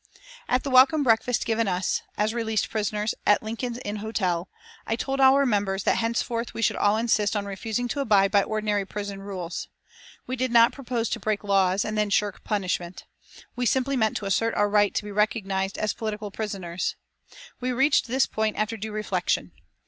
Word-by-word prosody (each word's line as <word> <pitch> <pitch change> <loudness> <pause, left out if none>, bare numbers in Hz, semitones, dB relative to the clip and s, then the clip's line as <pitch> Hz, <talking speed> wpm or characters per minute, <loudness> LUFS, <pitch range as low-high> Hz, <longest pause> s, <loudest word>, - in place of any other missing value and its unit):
At 250 - +2
the 275 - -3
welcome 270 +4 +6
breakfast 235 0 +2
given 225 -1 0
us, 180 -1 0 0.2
as 215 +1 +1
released 220 -2 -1
prisoners, 210 0 -1
at 205 - +3
Lincoln's 230 +2 -4
Inn 205 +1 -3
Hotel, 190 -5 -2 0.4
I 225 - +1
told 270 +3 -3
our 270 +1 +6
members 200 -4 0
that - - +2
henceforth 230 +1 -2
we 230 - -2
should - - +2
all 205 +1 +2
insist 220 -2 +1
on 205 -1 -1
refusing 220 +4 -3
to 285 - -3
abide 200 -7 +3
by 200 -1 +5
ordinary 210 -1 -1
prison 200 0 -6
rules. 185 -4 -5 0.6
We 255 - -3
did 255 0 -1
not 235 0 +6
propose 245 -4 -2
to 235 - -2
break 215 0 -1
laws 195 -1 +2
and 215 - -3
then 210 -1 +1
shirk 205 0 0
punishment. 185 -3 -3 0.5
We 245 0 0
simply 265 +3 +1
meant 220 -4 +1
to 205 - -6
assert 225 +4 +1
our 205 - +3
right 205 -1 +3
to - - 0
be 210 - -7
recognised 200 -2 0
as 215 - -1
political 215 -2 -5
prisoners. 190 -5 -3 0.6
We 255 0 -1
reached 270 +3 +3
this 260 +2 +2
point 220 -1 -1
after 215 +1 -1
due 215 +1 -5
reflection. 215 0 -1
215 Hz, 185 wpm, -25 LUFS, 200-235 Hz, 0.6 s, welcome